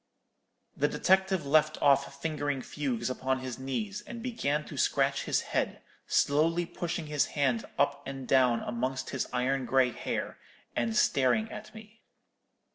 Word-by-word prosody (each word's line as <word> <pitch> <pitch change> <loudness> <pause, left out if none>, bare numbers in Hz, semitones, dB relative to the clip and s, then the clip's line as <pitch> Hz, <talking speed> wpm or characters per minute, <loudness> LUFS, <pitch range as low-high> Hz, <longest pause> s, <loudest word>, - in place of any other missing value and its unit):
"The - - +2
detective 190 -2 +2
left 155 +2 +3
off 140 0 +3
fingering 145 -3 -2
fugues 125 -6 -2
upon 130 +1 -1
his 130 -2 -5
knees, 200 +10 -3
and 235 -1 -7
began 185 - -1
to - - -9
scratch 135 0 +1
his - - +1
head, - - -1 0.2
slowly 165 +4 +2
pushing 170 -1 -4
his 150 -1 +1
hand 130 -5 +1
up 140 0 +1
and 135 -1 -6
down 125 -3 +4
amongst 130 +2 -3
his - - -2
iron 130 +1 0
grey 130 -2 +3
hair, - - -4 0.4
and 115 -2 0
staring 140 - +3
at 215 +1 -9
me. 220 +1 -13
140 Hz, 145 wpm, -30 LUFS, 130-170 Hz, 0.4 s, down